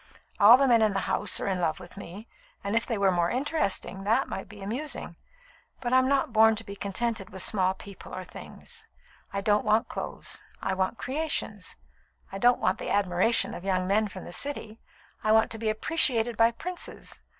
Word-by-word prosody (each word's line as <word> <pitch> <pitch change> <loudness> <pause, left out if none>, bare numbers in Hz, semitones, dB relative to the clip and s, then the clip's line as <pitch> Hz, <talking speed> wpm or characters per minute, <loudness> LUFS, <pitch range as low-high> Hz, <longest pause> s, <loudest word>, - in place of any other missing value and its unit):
All 220 +4 +9
the 275 0 +3
men 235 -3 +5
in 215 -2 +3
the 195 - 0
house - - +1
are - - -3
in 185 -2 -1
love 160 -1 0
with 180 -1 -12
me; 200 +3 -9 0.4
and 200 +2 -2
if 230 - +1
they 230 - -1
were 195 -1 +3
more 175 -1 +1
interesting, 250 - -1
that 225 +6 +2
might 195 - -6
be 205 -2 -11
amusing. 255 +9 -4 0.6
But 245 -1 -2
I'm 260 0 +5
not 270 -4 +1
born 220 0 +6
to 225 - -6
be 200 -2 -8
contented 200 +1 -3
with 190 0 -3
small 190 -2 +1
people 200 -1 -11
or 185 - -5
things. - - -11 0.4
I 200 - -2
don't 210 +1 +2
want 215 +1 +2
clothes. - - -6 0.2
I 190 - -1
want 190 +4 -1
creations. 265 -8 -3 0.6
I 195 - -5
don't 245 +2 +4
want 185 - +1
the - - -4
admiration 200 +3 +2
of 175 - -7
young 185 -1 0
men 210 +2 +2
from 190 -2 -9
the 175 - -8
City. 230 -3 -5 0.4
I 215 - +2
want 220 +1 +4
to 225 - -6
be 220 -1 0
appreciated 235 -1 +2
by 230 +1 +5
princes. 345 +9 -6
215 Hz, 200 wpm, -27 LUFS, 195-235 Hz, 0.6 s, All